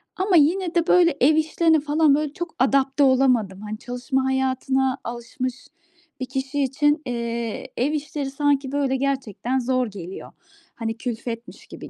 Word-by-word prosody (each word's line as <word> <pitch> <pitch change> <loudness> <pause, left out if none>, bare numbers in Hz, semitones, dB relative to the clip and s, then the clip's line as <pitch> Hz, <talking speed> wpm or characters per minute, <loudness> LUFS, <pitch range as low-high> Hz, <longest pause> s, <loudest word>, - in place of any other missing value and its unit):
ama 375 0 +1
yine 345 +4 +2
de, 340 0 +2
böyle, 345 -4 +4
ev 305 +4 +5
işlerine 320 +1 +3
falan, 295 0 +3
böyle, 300 -1 -2
çok 345 0 -6
adapte 270 +2 +3
olamadım. 250 -8 +2
Hani, 215 0 -5
çalışma 255 +2 -2
hayatına 265 0 0
alışmış 240 +2 -5 0.5
bir - - -1
kişi 270 +2 -2
için, 295 +3 +1
eee, 235 -2 -3
ev 265 +5 +1
işleri 290 -2 -3
sanki 280 -1 0
böyle 275 -2 0
gerçekten 265 -2 -1
zor 255 0 0
geliyor. 190 -3 -9 0.4
Hani, 225 -1 -4
külfetmiş 235 -1 -6
gibi - - -10
265 Hz, 145 wpm, -23 LUFS, 245-295 Hz, 0.5 s, ev